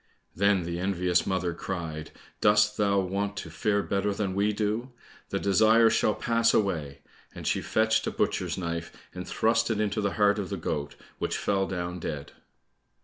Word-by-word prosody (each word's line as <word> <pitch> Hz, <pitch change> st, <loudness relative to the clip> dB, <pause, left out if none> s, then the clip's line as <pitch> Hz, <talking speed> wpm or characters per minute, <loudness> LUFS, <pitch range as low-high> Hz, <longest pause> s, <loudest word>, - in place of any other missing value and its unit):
Then 100 Hz, -1 st, +3 dB
the 85 Hz, 0 st, -4 dB
envious 90 Hz, -2 st, +1 dB
mother 95 Hz, -2 st, 0 dB
cried, 80 Hz, -5 st, -5 dB, 0.3 s
"Dost 105 Hz, 0 st, +4 dB
thou 100 Hz, -1 st, +2 dB
want 100 Hz, +2 st, -2 dB
to -, -, -6 dB
fare 100 Hz, -2 st, 0 dB
better 100 Hz, 0 st, -1 dB
than 100 Hz, -2 st, -2 dB
we 100 Hz, +2 st, +2 dB
do? 110 Hz, +4 st, -2 dB, 0.4 s
The -, -, -1 dB
desire 110 Hz, +3 st, +5 dB
shall 105 Hz, -, +2 dB
pass 115 Hz, 0 st, +2 dB
away," 75 Hz, -9 st, -1 dB, 0.3 s
and -, -, -8 dB
she -, -, +1 dB
fetched 110 Hz, 0 st, +1 dB
a -, -, 0 dB
butcher's -, -, -1 dB
knife, 85 Hz, -2 st, -4 dB, 0.2 s
and 90 Hz, 0 st, -7 dB
thrust 115 Hz, +1 st, +1 dB
it 110 Hz, -2 st, 0 dB
into 105 Hz, 0 st, 0 dB
the 100 Hz, -1 st, 0 dB
heart 105 Hz, 0 st, +3 dB
of 95 Hz, -, -4 dB
the 100 Hz, -, -3 dB
goat, 75 Hz, -3 st, -3 dB, 0.2 s
which -, -, -1 dB
fell 95 Hz, -1 st, 0 dB
down 90 Hz, -1 st, -4 dB
dead. 75 Hz, -4 st, -5 dB
100 Hz, 175 wpm, -27 LUFS, 90-105 Hz, 0.4 s, desire